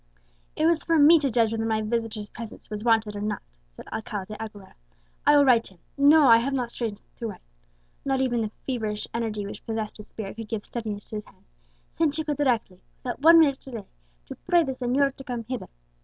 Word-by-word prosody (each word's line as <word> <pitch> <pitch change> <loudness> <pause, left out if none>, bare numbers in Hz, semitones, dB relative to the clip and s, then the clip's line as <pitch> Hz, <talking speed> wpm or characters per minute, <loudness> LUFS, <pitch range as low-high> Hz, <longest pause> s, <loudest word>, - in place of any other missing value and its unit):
"It 310 - +1
was 330 -1 +3
for 330 -1 +2
me 315 +3 +8
to 280 -2 0
judge 230 -2 +2
whether 225 0 -1
my 220 -1 0
visitor's 220 -1 -2
presence 230 -1 -10
was 210 0 -4
wanted 225 -3 +2
or 205 - -4
not," 210 0 -3 0.3
said - - -11
Alcala 215 -3 -4
de 215 - -9
Aguilera. 210 -3 -9 0.5
"I 295 - +7
will 285 - +6
write 235 -3 +5
to 190 - -14
him, - - -29 0.2
no, 290 +1 +6
I 230 -2 +9
have 260 +4 -1
not 245 -3 -1
strength 220 -4 -4
to 230 - -4
write" 205 - -9 0.6
(not 270 -1 0
even 245 -3 +1
the 215 - -1 0.2
feverish 220 -5 -3
energy 220 -3 -2
which 200 - -8
possessed 220 -1 -4
his 210 - -11
spirit 210 -1 -7
could 225 -1 -6
give 215 -2 -3
steadiness 215 -4 -5
to 215 - -4
his 210 - -7
hand) - - -22 0.5
"send 310 -3 +2
Chico 305 -1 -1
directly, 240 -10 0 0.2
without 250 +1 -4
one 330 +3 +8
minute's 285 -4 +4
delay, 230 -6 -7 0.4
to - - -8
pray 345 -1 +3
the 270 - -2
señor 265 +2 +1
to 270 - -9
come 245 -4 -4
hither. 245 0 -5
230 Hz, 220 wpm, -26 LUFS, 215-275 Hz, 0.6 s, I